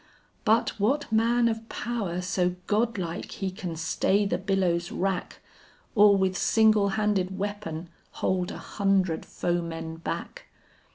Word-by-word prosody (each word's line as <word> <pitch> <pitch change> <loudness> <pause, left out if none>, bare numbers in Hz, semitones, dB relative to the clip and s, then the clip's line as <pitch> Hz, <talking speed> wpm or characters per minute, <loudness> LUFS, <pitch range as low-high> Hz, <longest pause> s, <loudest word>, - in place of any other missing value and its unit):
But 220 -1 +2
what 265 +6 +1
man 235 +2 +3
of 225 0 -3
power 205 -7 -3
so 180 -1 0
godlike 205 -5 -1
he 195 -1 -3
can 185 -4 -5
stay 190 +5 +1
the 180 -3 0
billow's 185 -3 0
wrack, 190 -1 -2 0.5
Or 205 -2 +6
with 190 -1 +1
single 215 -1 +4
handed 195 -3 0
weapon 195 -5 -4 0.3
hold 185 -1 0
an - - -6
hundred 195 -5 0
foemen 165 -2 -3
back! 165 - -5
195 Hz, 125 wpm, -27 LUFS, 180-215 Hz, 0.5 s, Or